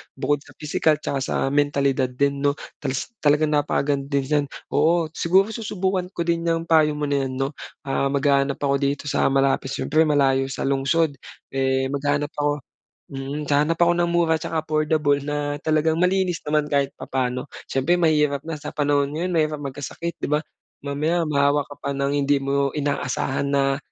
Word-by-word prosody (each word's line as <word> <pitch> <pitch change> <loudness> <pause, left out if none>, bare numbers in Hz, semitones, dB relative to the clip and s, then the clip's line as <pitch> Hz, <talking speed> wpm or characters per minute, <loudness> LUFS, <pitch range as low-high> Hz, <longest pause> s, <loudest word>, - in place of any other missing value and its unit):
bukod 140 +2 0
sa - - -18
pisikal, 155 0 +1
at 150 - -16
saka 140 - -1
sa - - -2 0.2
mentalidad 140 -2 +2
din 140 +2 0
'no 145 0 +2 0.2
talas 135 -2 -3
talagang 150 +1 +3
napakaganda 145 -1 0
diyan. 145 +1 0 0.3
Oo, 165 0 +3
siguro 185 +4 +3
susubukan 190 -4 -2
ko 170 - -2
din 170 0 +1
'yang 165 0 +1
payo 155 -2 +4
mo 150 - -4
na 140 -1 +1
yan 130 -1 -4
'no. 135 0 0 0.3
Ah, 135 0 0
maghahanap 140 -1 +2
ako 140 -1 +1
dito 140 +1 -1
sa - - +2
malapit 135 0 +1
siyempre 155 +4 +2
malayo 135 -2 +2
sa 135 - -4
lungsod, 140 +2 +1 0.3
eh, 130 0 +1
maghahanap 145 +1 -1
ako 145 -1 -1 0.5
mm. 135 +2 -4
Hahanap 150 +3 +2
ako 175 0 +4
ng 170 - 0
mura 170 -1 +2
at 160 - -2
saka 165 - -3
affordable 155 -2 +1
na 145 0 -3
talagang 155 0 +2
malinis 180 -1 +1
naman 150 0 0
kahit 140 -2 +1
papaano. 125 0 -2 0.2
Siyempre 135 +6 +2
mahirap 150 -4 +2
na 160 0 -5
sa - - -7
panahon 145 -1 +1
ngayon 175 +4 -2
mahirap 155 -3 0
magkasakit 145 +4 -5
'di - - -3
ba? 150 - +2 0.4
Mamaya 150 +5 0
mahawa 140 0 +3
ka 145 - -9
pa 140 - -3
ng 140 0 0
hindi 140 0 +2
mo 140 0 0
inaasahan 140 -2 -1
na 135 -1 +1
145 Hz, 175 wpm, -23 LUFS, 140-155 Hz, 0.5 s, payo